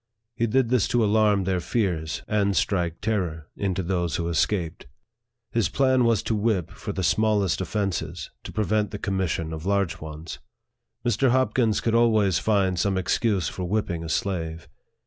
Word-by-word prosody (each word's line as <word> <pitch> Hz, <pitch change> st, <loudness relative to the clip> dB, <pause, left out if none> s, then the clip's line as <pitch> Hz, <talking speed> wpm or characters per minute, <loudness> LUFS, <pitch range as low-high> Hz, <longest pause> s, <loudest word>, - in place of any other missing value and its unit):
He 115 Hz, -, +1 dB
did 125 Hz, +1 st, +2 dB
this 125 Hz, -4 st, +2 dB
to 120 Hz, -2 st, +2 dB
alarm 105 Hz, -2 st, +3 dB
their 95 Hz, -1 st, 0 dB
fears, 85 Hz, -5 st, -1 dB
and 100 Hz, -2 st, +1 dB
strike 85 Hz, -4 st, 0 dB
terror 90 Hz, -8 st, -2 dB
into 95 Hz, -2 st, -1 dB
those 85 Hz, -2 st, -1 dB
who 85 Hz, -1 st, -1 dB
escaped. 85 Hz, -1 st, -1 dB, 0.6 s
His 115 Hz, -7 st, +1 dB
plan 130 Hz, -2 st, +3 dB
was 115 Hz, -2 st, +2 dB
to 115 Hz, -, -1 dB
whip 105 Hz, -5 st, 0 dB
for -, -, -6 dB
the 95 Hz, -, -3 dB
smallest 100 Hz, 0 st, +2 dB
offences, 90 Hz, -5 st, -3 dB
to -, -, -6 dB
prevent 105 Hz, 0 st, 0 dB
the 105 Hz, -, -5 dB
commission 95 Hz, -5 st, -2 dB
of 80 Hz, -1 st, -6 dB
large 100 Hz, -3 st, 0 dB
ones. 80 Hz, +1 st, -7 dB, 0.7 s
Mr. 120 Hz, +3 st, +2 dB
Hopkins 120 Hz, -3 st, +2 dB
could 115 Hz, -, 0 dB
always 110 Hz, -6 st, +3 dB
find 95 Hz, -4 st, +1 dB
some 95 Hz, 0 st, +1 dB
excuse 95 Hz, 0 st, +1 dB
for 90 Hz, -, -4 dB
whipping 90 Hz, -3 st, -1 dB
a 80 Hz, -, -6 dB
slave. 80 Hz, -3 st, -2 dB
100 Hz, 165 wpm, -25 LUFS, 85-110 Hz, 0.7 s, alarm